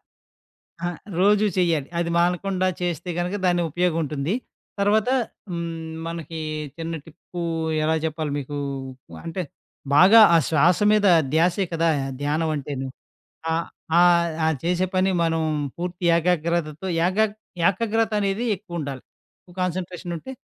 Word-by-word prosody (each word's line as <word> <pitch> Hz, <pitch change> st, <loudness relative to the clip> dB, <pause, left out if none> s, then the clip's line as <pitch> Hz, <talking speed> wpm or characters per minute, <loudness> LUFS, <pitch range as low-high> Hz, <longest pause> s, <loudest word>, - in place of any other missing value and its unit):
ఆహ్, -, -, -49 dB, 0.8 s
ఆ! -, -, +1 dB, 0.3 s
రోజు 210 Hz, +2 st, +4 dB
చెయ్యాలి. 165 Hz, -6 st, +1 dB
అది 170 Hz, 0 st, 0 dB
మానకుండా 185 Hz, +2 st, +1 dB
చేస్తే 175 Hz, 0 st, -2 dB
గనక 180 Hz, +3 st, -1 dB
దానికి 175 Hz, -1 st, +2 dB
ఉపయోగం 175 Hz, 0 st, +1 dB
ఉంటుంది. 150 Hz, +6 st, -2 dB, 0.5 s
తర్వాత 210 Hz, +3 st, +3 dB, 0.4 s
హ్మ్, 165 Hz, -2 st, -4 dB, 0.2 s
మనకి 165 Hz, -1 st, -6 dB, 0.4 s
చిన్న 165 Hz, 0 st, -4 dB
టిప్పు 170 Hz, +2 st, -10 dB, 0.4 s
ఎలా 160 Hz, +1 st, +2 dB
చెప్పాలి 155 Hz, -1 st, -3 dB
మీకు 145 Hz, +1 st, -5 dB, 0.7 s
అంటే, 170 Hz, +2 st, -3 dB, 0.5 s
బాగా 195 Hz, +8 st, +8 dB
ఆ -, -, +8 dB
శ్వాస 165 Hz, +3 st, +4 dB
మీద 210 Hz, -1 st, +3 dB, 0.3 s
ధ్యాసే 175 Hz, +4 st, +2 dB
కదా! 165 Hz, 0 st, +2 dB, 0.3 s
ధ్యానం 155 Hz, +2 st, 0 dB
అంటేను 135 Hz, -1 st, -4 dB, 0.7 s
ఆహ్, 165 Hz, +1 st, -1 dB, 0.3 s
ఆహ్, 175 Hz, -1 st, +5 dB, 0.2 s
ఆ -, -, +3 dB, 0.2 s
చేసే 180 Hz, +2 st, +1 dB
పని 190 Hz, +1 st, +3 dB
మనం 165 Hz, 0 st, +1 dB, 0.4 s
పూర్తి 175 Hz, 0 st, -4 dB
ఏకాగ్రతతో 170 Hz, 0 st, 0 dB, 0.2 s
ఏకా 210 Hz, +4 st, +3 dB, 0.4 s
ఏకాగ్రతనేది 215 Hz, +1 st, 0 dB
ఎక్కువుండాలి. 165 Hz, -, -6 dB, 0.6 s
కాన్సన్‌ట్రేషన్ 180 Hz, 0 st, -3 dB
ఉంటే. 265 Hz, -, -9 dB
175 Hz, 120 wpm, -23 LUFS, 160-185 Hz, 0.8 s, బాగా